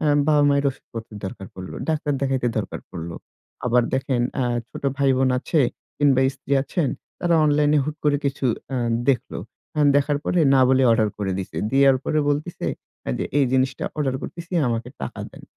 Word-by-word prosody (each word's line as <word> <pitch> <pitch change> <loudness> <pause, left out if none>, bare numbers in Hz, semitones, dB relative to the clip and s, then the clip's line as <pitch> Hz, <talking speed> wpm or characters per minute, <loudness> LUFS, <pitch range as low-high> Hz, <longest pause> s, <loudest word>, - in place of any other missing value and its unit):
অ্যা 150 -2 +2 0.2
বাবা-মায়ের 145 -2 +4
ওষুধপত্রের 115 -5 -9
দরকার 95 0 -6
পড়ল। 95 0 -8 0.2
ডাক্তার 150 -2 0
দেখাইতে 130 -2 +1
দরকার 100 - -4
পড়ল। 85 -1 -6 0.6
আবার 125 0 +4
দেখেন 130 -1 0 0.2
আ - - +1 0.3
ছোট - - -9
ভাই-বোন 135 -2 +3
আছে 155 +4 +1 0.4
কিংবা, 140 -3 +4
স্ত্রী 140 0 -7
আছেন 145 +1 -1 0.3
তারা 175 -1 +2
অনলাইনে 150 0 +3
হুট 150 +1 -4
করে 145 -1 +4
কিছু 135 -1 0 0.3
আ - - 0 0.3
দেখল। 130 -4 +1 0.4
অ্যা 150 - +2
দেখার 145 0 +2
পরে 180 - +2
না 130 - +5
বলে 130 0 +4
অর্ডার 110 -2 +3
করে 95 -2 -1
দিছে, 95 - -6
দেওয়ার 135 0 +5
পরে 155 - +1
বলতেছে 150 +4 -2 0.5
যে - - -1
এই 140 - +5
জিনিসটা 130 0 +1
অর্ডার 140 -4 0
করছি 170 - -6 0.3
আমাকে 115 +1 -2
টাকা - - -5
দেন। - - -14
135 Hz, 170 wpm, -23 LUFS, 125-145 Hz, 0.6 s, না